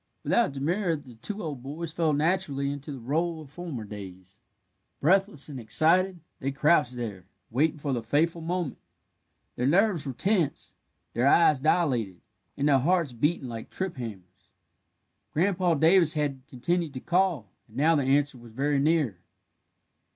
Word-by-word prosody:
Without 235 -11 +2
demur 165 +6 0
the 140 -5 -11
two 200 - -6
old 145 -6 -5
boys 155 +5 -6
fell 160 -1 +1
naturally 145 -3 0
into 145 +1 -7
the 135 - -6
rôle 160 +7 -1
of 150 -3 -12
former 160 -8 -6
days. 95 -2 -10 0.6
Breathless 190 -2 +2
and 140 -4 -7
excited, 170 - +2 0.2
they 135 - -2
crouched 145 -2 +3
there, 105 -7 -5 0.3
waiting 150 +6 +1
for 140 -2 -2
the 120 - -1
fateful 160 +8 +1
moment. 170 -3 -3 0.8
Their 125 - 0
nerves 175 -2 +2
were 135 - -3
tense, 185 - 0 0.4
their 120 +4 +2
eyes 155 -1 +5
dilated, 130 - +1 0.4
and 140 +1 +1
their 140 -2 +5
hearts 165 -1 +1
beating 145 +3 0
like 115 -2 -7
trip 190 -2 -4
hammers. 95 -5 -9 0.8
Grandpa 180 0 +2
Davis 165 +1 +4
had 145 -3 -1
continued 150 +3 -2
to - - -3
call, 175 - 0 0.2
and 110 - -14
now 160 +4 +4
the 145 - +2
answer 140 0 +1
was 120 -1 -14
very 140 +3 +1
near. 145 - +1
145 Hz, 155 wpm, -27 LUFS, 125-170 Hz, 0.8 s, eyes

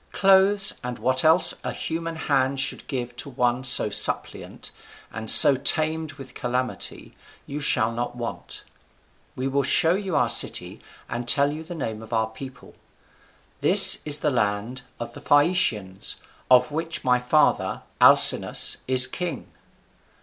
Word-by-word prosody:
Clothes 195 +1 +2
and 125 -1 -7
what 130 +3 -2
else 160 +3 +4
a - - -5
human 165 0 -7
hand 140 -3 -3
should 135 - -4
give 125 -3 -7
to 140 - -7
one 125 -1 -3
so 125 -5 +2
suppliant, - - -1 0.4
and 110 0 -4
so 140 - +9
tamed 155 +3 -1
with 135 -2 -14
calamity, 125 0 -6 0.3
you 145 - -8
shall 115 -6 0
not 120 +1 -7
want. 120 -1 -9 0.7
We 130 +1 -5
will 140 +1 -2
show 160 +5 +1
you 190 -3 -5
our - - 0
city - - +2 0.3
and 120 +1 -7
tell 140 +3 +2
you 155 +2 -9
the 175 +2 -10
name 110 -8 -7
of 110 +1 -12
our 110 -1 -1
people. 130 +2 -13 0.9
This - - +6
is 150 -1 -3
the 150 - -2
land 110 +1 -4 0.2
of 120 - -9
the - - -13
Phaeacians, 135 - -1 0.3
of 125 0 +2
which 165 +2 -7
my 125 -1 0
father, 125 +5 -1 0.2
Alcinous, - - +4
is 130 0 +4
king." 170 -2 -8
130 Hz, 150 wpm, -21 LUFS, 120-155 Hz, 0.9 s, so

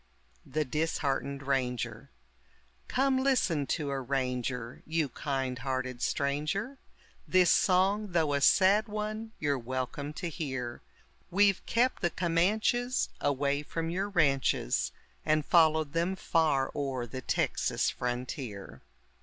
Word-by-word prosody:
THE 150 +3 -1
DISHEARTENED 140 -1 -1
RANGER 130 -3 -2 0.8
Come 265 0 +2
listen 205 - +1
to 150 -4 -1
a 135 -1 -2
ranger, 125 -2 -2
you 160 -2 0
kind 130 -1 -3
hearted 130 -1 -3
stranger, 155 - -1 0.5
This 185 -2 +5
song, 195 +2 +2
though 160 -4 +2
a 140 - +1
sad 200 - +5
one, 215 +1 -4
you're 145 -3 0
welcome 130 +4 -4
to 175 +3 -4
hear; 130 -7 -4 0.5
We've 200 +1 +3
kept 250 +3 +1
the 175 - +2
Comanches 215 +9 +1
away 140 +1 0
from 165 +2 -4
your 195 +3 -1
ranches, 140 - +1 0.3
And 155 -1 +1
followed 160 -3 +4
them 170 +3 0
far 155 -7 +1
o'er 135 -4 -2
the 130 +3 -7
Texas - - 0
frontier. 125 - -5
150 Hz, 120 wpm, -30 LUFS, 135-185 Hz, 0.8 s, This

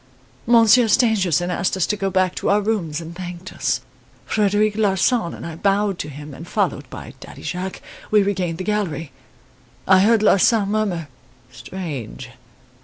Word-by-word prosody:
Monsieur 230 0 +6
Stangerson 190 - +2
asked 180 +2 -1
us 185 - +2
to 210 - -1
go 195 -1 -2
back 185 -1 +1
to - - -2
our 205 - +4
rooms 200 -8 -2
and 165 0 -9
thanked 180 0 -8
us. - - -1 0.4
Frederic 210 0 +1
Larsan 210 -1 +1
and - - -9
I 165 -1 -6
bowed 200 +1 0
to 150 - -4
him 145 +1 -9
and, 165 +5 -10
followed - - -1
by - - -9
Daddy - - -12
Jacques, 180 +1 -5 0.3
we 210 -1 +4
regained 185 -4 -1
the 185 - -4
gallery. 180 -7 -2 0.8
I 190 0 +6
heard 215 +2 +4
Larsan 205 0 +4
murmur: 200 -7 -1 0.4
'Strange! 135 - -7
190 Hz, 160 wpm, -21 LUFS, 170-210 Hz, 0.8 s, Monsieur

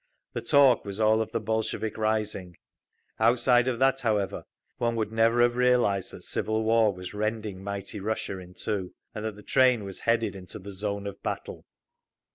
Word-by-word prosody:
The - - -3
talk 140 -4 +5
was 100 0 -5
all 110 0 +4
of 110 - -3
the - - -1
Bolshevik 110 0 -2
rising. 105 -5 -2 0.6
Outside 120 +1 +4
of 125 -2 0
that, 135 +1 +3
however, 105 -5 -1 0.3
one 115 -1 +1
would 110 -1 -1
never 115 +2 +4
have 120 0 +3
realised 120 -6 +2
that - - -11
civil 110 0 -1
war 110 -1 +4
was 90 0 -8
rending 105 -2 -3
mighty 100 +1 -5
Russia 100 -2 -3
in 90 0 -12
two, 100 -4 -3 0.2
and 105 - -5
that 110 -2 -3
the 105 - -13
train 125 -4 +3
was 95 -1 -7
headed 115 -4 +1
into 90 -1 -8
the 100 0 -9
zone 100 +1 -3
of 100 -1 -7
battle. - - -5
110 Hz, 180 wpm, -27 LUFS, 100-115 Hz, 0.6 s, talk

